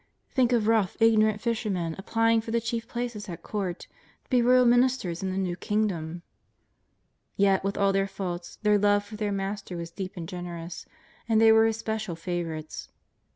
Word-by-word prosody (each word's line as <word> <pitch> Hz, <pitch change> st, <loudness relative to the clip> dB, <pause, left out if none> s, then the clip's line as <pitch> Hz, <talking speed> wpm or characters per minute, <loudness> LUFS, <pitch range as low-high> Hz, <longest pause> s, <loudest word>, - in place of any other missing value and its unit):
Think 255 Hz, -3 st, +2 dB
of 230 Hz, -3 st, +2 dB
rough, 220 Hz, -4 st, +2 dB
ignorant 215 Hz, -2 st, +4 dB
fishermen 200 Hz, -8 st, -1 dB
applying 225 Hz, +3 st, +2 dB
for 225 Hz, -, -9 dB
the 235 Hz, +1 st, +1 dB
chief 230 Hz, 0 st, -3 dB
places 235 Hz, -4 st, -4 dB
at 170 Hz, -1 st, -7 dB
Court, 190 Hz, -4 st, -3 dB, 0.4 s
to -, -, -36 dB
be 250 Hz, -1 st, +4 dB
royal 250 Hz, +1 st, +5 dB
ministers 245 Hz, -8 st, +2 dB
in 190 Hz, -, -2 dB
the 185 Hz, -, -3 dB
new 185 Hz, -2 st, -1 dB
Kingdom! 175 Hz, -5 st, -2 dB, 1.1 s
Yet 195 Hz, -1 st, +3 dB
with 195 Hz, +1 st, -2 dB
all 200 Hz, -1 st, +3 dB
their 195 Hz, 0 st, +1 dB
faults, 180 Hz, -3 st, -5 dB
their 210 Hz, -1 st, +4 dB
love 205 Hz, 0 st, +3 dB
for 210 Hz, +1 st, -9 dB
their 210 Hz, -1 st, -2 dB
Master 195 Hz, -2 st, -4 dB
was 170 Hz, 0 st, -6 dB
deep 185 Hz, +1 st, -6 dB
and 165 Hz, -2 st, -5 dB
generous, 175 Hz, -1 st, -7 dB, 0.4 s
and 220 Hz, -1 st, +4 dB
they 225 Hz, 0 st, +7 dB
were 220 Hz, 0 st, +6 dB
His 225 Hz, 0 st, -1 dB
special 220 Hz, -5 st, -3 dB
fa 170 Hz, +2 st, -7 dB
vourites. 160 Hz, -3 st, -4 dB
205 Hz, 185 wpm, -27 LUFS, 180-225 Hz, 1.1 s, they